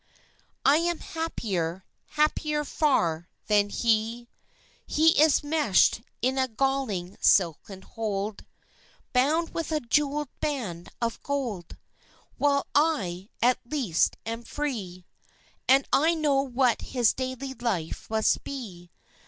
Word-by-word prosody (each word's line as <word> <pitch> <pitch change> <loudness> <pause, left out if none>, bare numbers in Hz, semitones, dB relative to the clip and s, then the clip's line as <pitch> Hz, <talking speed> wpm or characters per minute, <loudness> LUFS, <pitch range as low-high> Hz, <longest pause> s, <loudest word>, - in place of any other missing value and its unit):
I 285 +2 +6
am 340 +1 0
happier 190 - -3 0.3
happier 300 0 +1
far 175 - +1 0.2
than 205 -1 +3
he; 230 +2 0 0.6
He 320 0 +4
is 310 -2 +4
meshed 290 - +3 0.2
in 260 +1 +1
a 260 - +2
galling 225 -7 -2
silken 190 +2 +2
hold, 210 -2 -4 0.7
Bound 300 +6 +2
with 330 -1 -3
a 310 - +1
jewelled 290 +3 0
band 225 - -3
of 230 -1 -2
gold; 240 - -4 0.6
While 280 -1 +2
I, 205 - +1
at 250 +1 +4
least, 240 - 0
am 230 +1 -4
free. 210 -11 -4 0.6
And 270 +1 +5
I 320 +4 +4
know 290 -4 +2
what 255 -3 +1
his 245 -4 +1
daily 260 +1 -4
life 220 -10 -3
must 220 0 +1
be. 195 -11 -8
250 Hz, 115 wpm, -27 LUFS, 205-290 Hz, 0.7 s, I